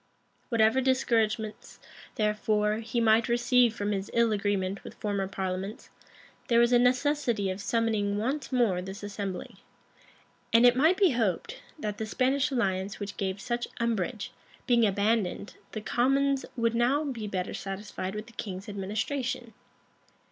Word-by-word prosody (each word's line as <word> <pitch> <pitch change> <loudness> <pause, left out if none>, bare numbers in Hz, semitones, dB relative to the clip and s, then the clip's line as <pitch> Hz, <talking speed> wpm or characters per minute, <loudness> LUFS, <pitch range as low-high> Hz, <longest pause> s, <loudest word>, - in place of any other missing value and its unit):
[] - - -40
Whatever 230 +1 +3
discouragements, 225 -4 0 0.4
therefore, 210 0 +1
he 230 +1 -2
might 225 +1 +4
receive 240 -1 +3
from 205 -1 -2
his 195 -1 -2
ill 235 -1 +4
agreement 200 -2 -1
with - - -10
former 200 -2 -2
parliaments, 190 +2 -4 0.6
there 235 -1 +4
was 235 +1 +4
a 245 - +6
necessity 250 -5 +2
of 185 +2 -5
summoning 210 -2 0
once 270 +7 -2
more 230 -8 +2
this 190 +2 -8
assembly: 200 +2 -5 0.9
and 230 +2 +6
it 245 0 +7
might 320 +8 +4
be 385 -5 +5
hoped, 240 - -1 0.2
that 210 -7 -4
the 220 - -3
Spanish 265 +5 +1
alliance 195 -6 -1
which 205 -1 -5
gave 190 0 -2
such 240 +3 -2
umbrage, 230 +1 -1 0.3
being 235 -3 +4
abandoned, 200 0 0 0.2
the 215 - -4
commons 270 +4 +1
would 230 -1 +1
now 250 +6 +2
be 240 -7 -4
better 185 -2 -3
satisfied 195 0 -5
with 210 +1 -5
the 235 - -16
king's 195 -1 -6
administration. 220 +5 -3
220 Hz, 150 wpm, -28 LUFS, 200-245 Hz, 0.9 s, it